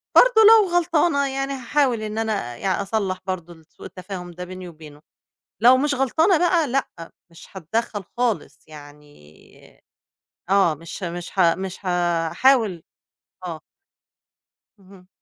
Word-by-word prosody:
برضه - - +6
لو 435 -4 +6
غلطانة 320 -4 +1
يعني 270 +1 -3
هاحاول 260 -2 0
إن 215 0 -5
أنا 210 - -2
يعني 190 0 -1
أصلّح 195 -2 -2
برضه 175 -2 -5
ال 160 -1 -20
سوء - - -16
التفاهم 185 -1 -8
ده 180 +1 -8
بيني 185 0 -9
وبينه، 155 -2 -14 0.6
لو 250 +2 +7
مش 285 +2 0
غلطانة 320 - +2
بقى 345 -2 +2
لأ، 265 +1 -1 0.4
مش 165 - -15
هاتدخّل 205 +3 -3
خالص 240 -4 -1
يعني 145 - -17 0.7
آه، 195 -5 +3
مش 165 +5 -10
ه 170 - -2
مش 175 0 -7
ه 170 -2 +4
مش 190 +1 -7
هاحاول 175 +4 +1 0.6
آه. 165 -3 -6 1.2
اهم. 185 -1 -18
195 Hz, 135 wpm, -22 LUFS, 170-265 Hz, 1.2 s, لو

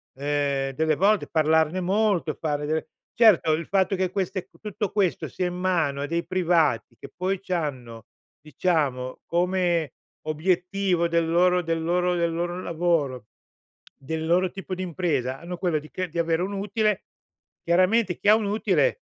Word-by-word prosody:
ehm, 140 -1 -1
delle 155 +2 +1
volte 200 +5 +2
parlarne 160 +2 +2
molto 195 -3 +1
e - - -7
fare 150 -2 -2
delle 155 +1 -2 0.3
certo, 215 -9 +5
il 160 +2 -2
fatto 195 0 +1
che 185 0 0
queste 190 -1 -2
c - - -44
tutto 210 -1 -3
questo 195 -5 0
sia 180 - -2
in 180 - -4
mano 170 -6 0
a - - -1
dei 170 +2 -2
privati 165 -10 +1
che - - -11
poi 185 +1 -1
c'hanno, 130 - -4 0.4
diciamo, 145 -4 -1
come 175 -3 0 0.3
obiettivo 180 +2 0
del 170 -1 +1
loro 180 +2 +3
del 165 -1 -2
loro 180 +2 +1
del 170 -1 0
loro 175 +2 -3
lavoro, 160 - -1 0.7
del 160 +4 -4
loro 180 +2 +2
tipo 195 -1 -6
di 185 - -4
impresa 150 -8 -2
hanno 175 +2 -7
quello 175 -4 0
di 155 +1 -13
che 185 0 -3
di 170 +2 -4
avere 165 0 +1
un 195 +2 -3
utile. 205 +1 0 0.6
Chiaramente, 185 +3 +2
chi - - -4
ha 210 - +8
un 220 -1 -1
utile, 220 - +1
175 Hz, 165 wpm, -25 LUFS, 155-185 Hz, 0.7 s, ha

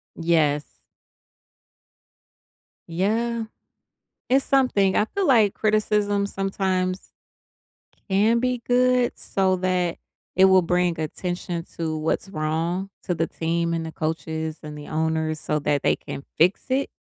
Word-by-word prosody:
Yes. 155 -3 0 2.0
Yeah. 225 +7 0 0.8
It's 265 +2 +3
something. 250 -8 +3
I 210 - +3
feel 390 - -2
like 220 -7 +5
criticism 210 -1 +1
sometimes 190 -1 -2 1.0
can 215 +5 +3
be 250 0 0
good, 250 0 +2
so 190 -1 +1
that 180 -2 0 0.4
it 190 - +6
will 190 -1 +6
bring 175 -1 +1
attention 175 +1 -4
to 160 -2 -2
what's 160 +5 -1
wrong 165 +3 -2
to 180 - -1
the 165 0 0
team, 170 +1 -1
and 165 -1 -2
the 160 - -6
coaches, 160 0 -3
and 150 0 -7
the 145 - -9
owners 160 0 -1
so 150 0 -1
that 145 -1 0
they - - +3
can 140 - -8
fix 180 +4 +3
it. 265 +2 0
185 Hz, 125 wpm, -24 LUFS, 160-210 Hz, 2.0 s, it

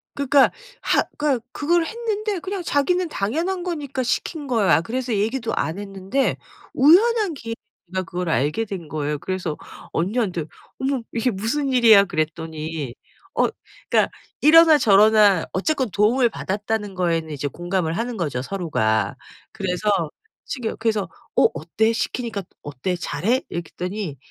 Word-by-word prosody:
그 280 -1 -3
그러니까 275 0 +5 0.3
하 - - +3 0.2
그러니까 280 -6 0
그걸 335 +3 +2
했는데 430 -2 -2
그냥 380 +2 -4
자기는 345 +4 +1
당연한 330 - -1
거니까 290 -7 -3
시킨 290 +5 -2
거야. 220 -9 +3
그래서 250 +6 -3
얘기도 225 +3 -1
안 165 +5 -2
했는데 195 +6 -1 0.4
우연한 400 - +5
기회에 230 -5 -6 0.3
그니까 185 +2 -2
그걸 180 0 -4
알게 155 +8 +1
된 190 -6 -6
거예요. 150 -1 -2
그래서 180 -3 -3 0.3
언니한테 185 -2 -1 0.3
"어머 265 -1 0
이게 240 +2 +1
무슨 230 +8 -1
일이야?" 225 -5 +7
그랬더니 155 -4 -3 0.4
어 - - +3 0.4
그러니까 - - +3 0.3
이러나 320 +1 +8
저러나 210 - +5
어쨌건 260 +6 0
도움을 235 +5 +3
받았다는 205 0 -3
거에는 165 -3 0
이제 145 -1 -3
공감을 175 +2 -2
하는 235 +1 -2
거죠 145 -8 -2
서로가. 110 - 0 0.4
그래서 190 +2 -2 0.6
시켜 240 -4 -4
그래서 215 -5 0 0.3
"어 - - +5
어때? 220 +8 0
시키니까 225 -2 -3 0.2
어때? 145 +6 -3
잘해?" 225 +8 0
이렇게 170 -1 -5
했더니 180 -5 -4
215 Hz, 340 characters per minute, -22 LUFS, 175-270 Hz, 0.6 s, 이러나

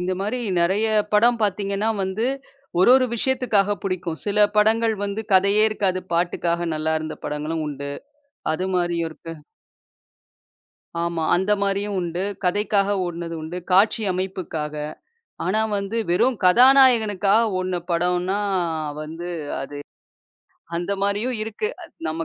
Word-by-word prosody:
இந்த 180 +1 -1
மாரி, 210 +6 -2 0.2
நிறைய 190 +6 +2 0.3
படம் 235 +3 +4
பாத்தீங்கன்னா 200 +1 0
வந்து, 195 +4 -1 0.5
ஒரு 190 - +6
ஒரு 260 -1 +4
விஷயத்துக்காக 225 -5 +1
புடிக்கும். 180 -4 -3
சில, 210 0 +4
படங்கள் 220 +1 +3
வந்து 205 +2 -3
கதையே 200 +3 +5
இருக்காது, 185 -3 -1
பாட்டுக்காக 170 0 0
நல்லா 155 +1 0
இருந்த 155 0 -6
படங்களும் 155 +2 -3
உண்டு. 140 0 -5 0.6
அது 185 +3 -2
மாரியும் 170 -2 0
இருக்கு. 165 +1 -9 1.7
ஆமா, 170 -1 -2
அந்த 190 +4 +1
மாரியும் 200 +1 -1
உண்டு. 175 +1 -3 0.2
கதைக்காக 205 +1 +1
ஓட்னதும் 170 -1 -5
உண்டு. 170 +3 -5
காட்சி 210 +4 +4
அமைப்புக்காக 180 -5 -4 0.7
ஆனா, 215 +4 +1 0.2
வந்து 200 +3 -3
வெறும் 240 +8 +2
கதாநாயகனுக்காக 225 -2 +5
ஓடுன 185 0 -2 0.2
படம்னா 180 +3 0 0.6
வந்து 165 +3 -7 0.3
அது 145 +1 -7 1.0
அந்த 175 +3 -2
மாரியும் 205 +5 0
இருக்கு. 225 - -3 0.4
நம்ம 160 +1 -3
190 Hz, 120 wpm, -22 LUFS, 170-210 Hz, 1.7 s, ஒரு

